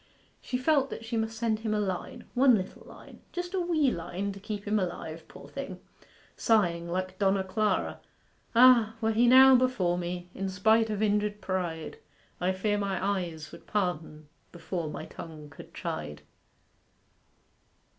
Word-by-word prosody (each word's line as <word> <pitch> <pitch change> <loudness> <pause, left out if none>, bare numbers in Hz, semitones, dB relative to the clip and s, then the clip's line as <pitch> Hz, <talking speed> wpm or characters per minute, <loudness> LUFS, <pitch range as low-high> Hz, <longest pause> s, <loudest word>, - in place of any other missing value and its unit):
She 250 - -2
felt 275 0 +2
that 225 - -7
she 225 - -4
must 220 0 -2
send 220 -1 0
him 220 -1 -1
a - - +1
line 190 -3 -4
one 255 -1 +6
little 190 -3 -5
line - - -14
just 355 +1 -5
a 380 - +1
wee 320 -6 +2
line 185 +3 -4
to 195 - -10
keep 210 0 -6
him 210 +1 +2
alive, 165 -3 -5
poor - - -12
thing; - - -7 0.6
sighing 170 -6 +2
like 185 +1 -3
Donna 195 -1 +2
Clara 205 +1 0 0.6
'Ah, 235 -3 +6
were 225 -1 +1
he 235 +2 +3
now 260 +1 +9
before 245 -9 +2
me, 175 0 -4
In 195 0 -3
spite 220 +4 +3
of 210 0 -1
injured 210 0 +1
pride, 175 -5 -3 0.4
I 180 +1 +1
fear 205 +2 0
my 200 -2 -1 0.2
eyes 160 -4 -7
would - - -13
pardon 160 -6 -2 0.2
Before 170 -2 -4
my - - -6
tongue 155 -3 -10
could - - -12
chide. 75 -1 -5
200 Hz, 160 wpm, -29 LUFS, 175-225 Hz, 0.6 s, now